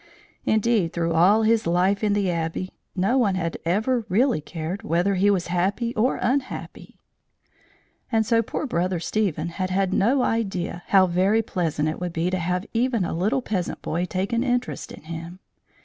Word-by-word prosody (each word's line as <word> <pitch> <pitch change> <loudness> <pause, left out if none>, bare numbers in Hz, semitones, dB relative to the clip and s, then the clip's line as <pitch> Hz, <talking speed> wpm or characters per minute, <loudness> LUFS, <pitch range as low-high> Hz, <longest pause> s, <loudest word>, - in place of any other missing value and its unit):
Indeed, 215 -5 +2
through 170 -1 0
all 190 +7 +5
his 220 -3 +2
life 185 +4 +2
in 210 -1 +2
the 200 -3 +1
Abbey, 170 +2 -3 0.2
no 200 +8 +2
one 200 -6 +2
had 170 -3 -2
ever 220 +8 +1
really 230 - +2
cared 165 +6 -5
whether 185 -1 +1
he 195 +2 +3
was 190 -4 +1
happy 200 +7 0
or 240 +3 +1
unhappy; 260 +2 -3 1.1
and 220 -2 +2
so 230 +1 +3
poor 230 - -4
Brother 180 -6 -1
Stephen 170 -3 -1
had 185 +2 -3
had 190 0 0
no 250 +6 +3
idea 190 -6 -1
how 190 -1 +6
very 190 +5 +2
pleasant 160 -6 -1
it 155 - -3
would 175 -1 -3
be 170 +2 0
to 185 - 0
have 180 +3 -1
even 235 -4 +1
a - - -3
little 205 +10 0
peasant 190 -7 -3
boy 170 +3 -1
take 185 +4 -3
an 235 +1 +2
interest 245 -1 -2
in - - -11
him. 165 +2 -7
190 Hz, 180 wpm, -24 LUFS, 175-225 Hz, 1.1 s, how